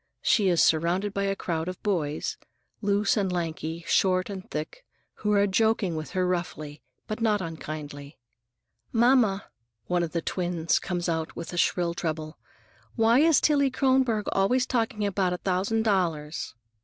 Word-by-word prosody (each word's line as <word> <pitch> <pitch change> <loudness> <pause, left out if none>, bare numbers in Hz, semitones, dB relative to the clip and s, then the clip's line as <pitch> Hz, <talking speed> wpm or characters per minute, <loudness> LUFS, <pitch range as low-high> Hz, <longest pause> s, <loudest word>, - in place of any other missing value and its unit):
She 205 -5 +3
is 175 -2 +4
surrounded 175 +5 +1
by 200 0 -1
a 195 0 0
crowd 165 -3 -3
of 185 0 -5
boys,—loose 200 +4 -2
and 195 -3 0
lanky, 165 -1 -3
short 185 0 +2
and 190 -2 -8
thick,—who 210 - -6
are 200 -1 +4
joking 205 -3 +1
with 155 -1 -5
her 185 -1 +1
roughly, 155 -5 -3 0.2
but 215 +2 -5
not 215 -2 +2
unkindly. 155 -4 -7 0.7
"Mamma," 230 -4 +3 0.4
one 180 0 0
of 170 -2 -2
the 170 -2 -1
twins 175 -3 0
comes 175 -1 -3
out 160 -1 -1
in 170 - -3
a - - -6
shrill 175 0 +1
treble, 155 -2 -4 0.6
"why 230 +2 +4
is 320 -1 +5
Tillie 285 -2 +3
Kronborg 260 -5 +1
always 245 +7 +2
talking 225 -4 -1
about 190 -2 0
a - - -2
thousand 195 +5 0
dollars?" 165 - -1
185 Hz, 150 wpm, -27 LUFS, 165-210 Hz, 0.7 s, is